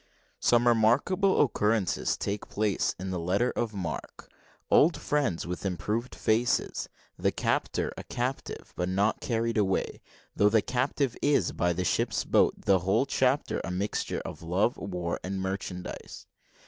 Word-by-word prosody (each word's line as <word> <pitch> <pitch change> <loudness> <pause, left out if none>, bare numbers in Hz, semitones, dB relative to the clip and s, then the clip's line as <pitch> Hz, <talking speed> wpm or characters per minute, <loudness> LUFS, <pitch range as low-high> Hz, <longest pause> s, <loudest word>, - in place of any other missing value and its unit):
SOME 120 0 +3
REMARKABLE 125 - +3
OCCURRENCES 105 - +1
TAKE 100 +1 -4
PLACE 105 -2 0
IN 95 +1 -5
THE 90 - -2
LETTER 95 +9 +1
OF 115 -3 -3
MARQUE 85 -5 -6 0.4
OLD 165 +2 +5
FRIENDS 140 - 0
WITH 90 +1 -5
IMPROVED 105 +6 -2
FACES 115 +2 0 0.3
THE - - +2
CAPTOR - - -1
A - - -7
CAPTIVE; 125 +3 -4
BUT 90 +1 -1
NOT 100 +4 +1
CARRIED 115 -1 0
AWAY, 95 -2 0 0.3
THOUGH 105 - +4
THE 110 0 +4
CAPTIVE 130 0 0
IS, 145 0 +2
BY 90 0 +1
THE 90 +2 -2
SHIP'S - - +1
BOAT - - +2
THE 95 -1 +5
WHOLE 95 +9 +2
CHAPTER 135 +1 +1
A - - -4
MIXTURE 95 +3 -2
OF - - -7
LOVE, 90 +8 +1
WAR, 90 -3 -3
AND 95 +1 -3
MERCHANDISE. 95 -1 -5
105 Hz, 150 wpm, -28 LUFS, 95-120 Hz, 0.4 s, OLD